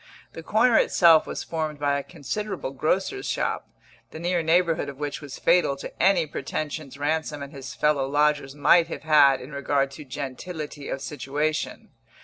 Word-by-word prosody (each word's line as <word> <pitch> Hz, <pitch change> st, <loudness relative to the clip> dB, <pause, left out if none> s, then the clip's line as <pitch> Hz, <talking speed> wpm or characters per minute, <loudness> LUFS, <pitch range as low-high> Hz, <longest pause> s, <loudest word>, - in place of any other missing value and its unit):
The 165 Hz, -, -8 dB
corner 225 Hz, +7 st, +3 dB
itself 165 Hz, -3 st, +5 dB
was -, -, -4 dB
formed 155 Hz, -2 st, -3 dB
by 140 Hz, -1 st, +1 dB
a -, -, -6 dB
considerable 190 Hz, +4 st, -5 dB
grocer's 190 Hz, -, -1 dB
shop, -, -, -2 dB, 0.4 s
the -, -, -9 dB
near 175 Hz, +1 st, 0 dB
neighbourhood 165 Hz, -1 st, +2 dB
of 140 Hz, -, -9 dB
which 145 Hz, 0 st, -4 dB
was 145 Hz, -3 st, -8 dB
fatal 170 Hz, -4 st, +3 dB
to 140 Hz, -, -8 dB
any 195 Hz, -4 st, +4 dB
pretensions 150 Hz, 0 st, -5 dB
Ransom 150 Hz, 0 st, -2 dB
and 140 Hz, -, -10 dB
his 135 Hz, -2 st, -8 dB
fellow 145 Hz, -3 st, +1 dB
lodgers 145 Hz, -1 st, +1 dB
might 165 Hz, +4 st, +5 dB
have 165 Hz, -, -7 dB
had 145 Hz, -4 st, +5 dB
in 130 Hz, -, -10 dB
regard 140 Hz, -1 st, 0 dB
to 150 Hz, +2 st, -9 dB
gentility 145 Hz, +2 st, -6 dB
of 135 Hz, -, -4 dB
situation. 150 Hz, +2 st, -3 dB
150 Hz, 165 wpm, -25 LUFS, 140-165 Hz, 0.4 s, itself